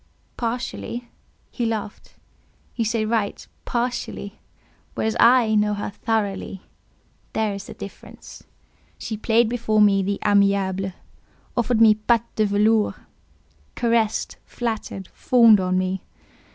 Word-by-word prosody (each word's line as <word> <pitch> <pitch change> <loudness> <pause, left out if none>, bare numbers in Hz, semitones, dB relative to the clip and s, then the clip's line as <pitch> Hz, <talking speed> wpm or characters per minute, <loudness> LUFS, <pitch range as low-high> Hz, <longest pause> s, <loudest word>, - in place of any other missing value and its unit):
"Partially." 240 0 -4 0.4
He 245 - -3
laughed. 220 -3 -4 0.6
"You 230 - 0
say 225 0 0
right—'partially'; 230 0 -3 0.6
whereas 220 0 -1
I 235 -2 +5
know 210 0 +2
her 205 - -4
thoroughly; 200 -3 -2 0.7
there 220 -2 0
is 200 0 -7
the - - -9
difference. 200 - -11 0.5
She 220 - -5
played 225 +2 +2
before 225 -2 0
me 200 -2 +5
the 200 +1 -1
amiable; 200 -2 +2 0.6
offered 240 -1 +1
me 220 -1 +8
patte 230 +2 0
de 215 -1 +2
velours; 210 +1 +2 0.8
caressed, 230 -2 0
flattered, 220 -5 -4
fawned 230 -4 +5
on 185 0 0
me. 185 0 -1
215 Hz, 110 wpm, -23 LUFS, 200-230 Hz, 0.8 s, me